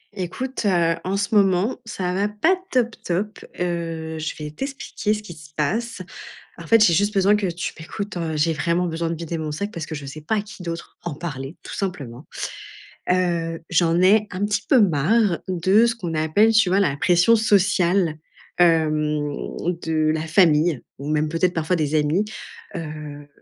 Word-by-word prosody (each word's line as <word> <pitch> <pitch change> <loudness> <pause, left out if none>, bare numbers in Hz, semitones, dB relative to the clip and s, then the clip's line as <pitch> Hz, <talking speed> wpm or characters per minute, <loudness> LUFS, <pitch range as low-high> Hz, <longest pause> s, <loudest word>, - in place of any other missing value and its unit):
Écoute, 210 +8 -4
heu, 170 -3 +3
en 190 +2 0
ce 200 +2 -2
moment, 195 +2 +3
ça 185 -5 -3
va 200 +2 +1
pas 210 - +2 0.2
top 240 -3 +1
top, 195 +4 -2 0.2
heu, 165 -2 -3
je 155 - -3
vais 150 -1 -6
t'expliquer 265 - -3
ce 210 - -7
qui 180 - -9
se 155 -1 -14
passe. 205 +7 -1 0.6
En 170 - -9
fait, 225 +2 +6
j'ai 170 - +4
juste 205 +5 +1
besoin 195 +2 +4
que 205 -2 0
tu 175 +1 -4
m'écoutes, 200 +4 -6
heu, 165 -2 -2
j'ai 160 +2 +2
vraiment 170 +4 0
besoin 165 -1 -2
de 165 - -2
vider 165 0 -4
mon 155 -1 -3
sac 200 +8 -4
parce 165 -3 -5
que 160 - -5
je 145 -2 -7
sais 140 +3 -8
pas 165 +9 -1
à 210 - +1
qui 205 -2 -12
d'autre 170 -1 -6
en 170 -4 -4
parler 140 -2 -6
tout - - -8
simplement. 145 -9 -5 0.9
Heu, 170 -2 0
j'en 170 0 +2
ai 205 +3 +5
un 200 +2 -1
petit 205 0 -1
peu 265 -4 +5
marre 190 +2 +2
de 190 +4 +3
ce 235 0 +2
qu'on 175 -8 -5
appelle 160 +9 +3
tu 215 -5 +4
vois 195 +2 +3
la 145 -8 +1
pression 180 +8 +4
sociale, 190 -5 +2 0.4
hem, 155 -3 +2 0.5
de 155 -1 +1
la 160 0 -3
famille 160 -4 +3 0.2
ou 140 +2 -6
même 155 0 +1
peut-être 170 +3 +1
parfois 165 +2 0
des 155 -2 -1
amis, 155 +6 +2 0.5
heu, 150 -3 -7
175 Hz, 185 wpm, -22 LUFS, 155-200 Hz, 0.9 s, fait